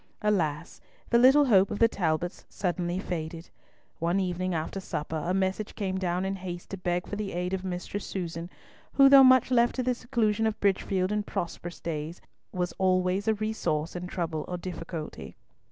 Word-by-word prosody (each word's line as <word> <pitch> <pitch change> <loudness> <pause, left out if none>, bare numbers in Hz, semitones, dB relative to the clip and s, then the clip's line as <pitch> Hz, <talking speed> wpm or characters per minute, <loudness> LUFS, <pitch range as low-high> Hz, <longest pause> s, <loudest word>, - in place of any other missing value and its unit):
Alas! 170 -6 0 0.3
the 235 - +6
little 270 +4 +7
hope 195 -6 +5
of - - -3
the 230 - +6
Talbots 175 -4 -2
suddenly 175 -2 -2
faded. 165 -3 -5 0.5
One 170 +3 +1
evening 185 -1 -1
after 160 +4 -3
supper 160 -3 -4
a - - +1
message 190 +2 -1
came 190 -3 -2
down 180 0 -1
in 195 0 -2
haste 175 -2 -7
to 195 - -4
beg 180 -1 -1
for - - -5
the 205 -1 -4
aid 180 +1 -2
of 190 -1 -2
Mistress 185 +2 -4
Susan, 170 -2 -5 0.4
who, 275 -1 +7
though 275 -1 +9
much 255 -1 +6
left 240 -1 +3
to 255 - -1
the 250 0 +1
seclusion 225 -3 0
of 215 -1 -3
Bridgefield 190 -1 +1
in 210 0 +1
prosperous 175 -3 -5
days, 160 +1 -4 0.3
was 180 -1 -2
always 185 +2 +2
a 220 - +3
resource 175 -8 -2
in 180 0 -4
trouble 165 -4 -3
or 180 - -3
difficulty. 165 - -7
185 Hz, 180 wpm, -28 LUFS, 175-210 Hz, 0.5 s, though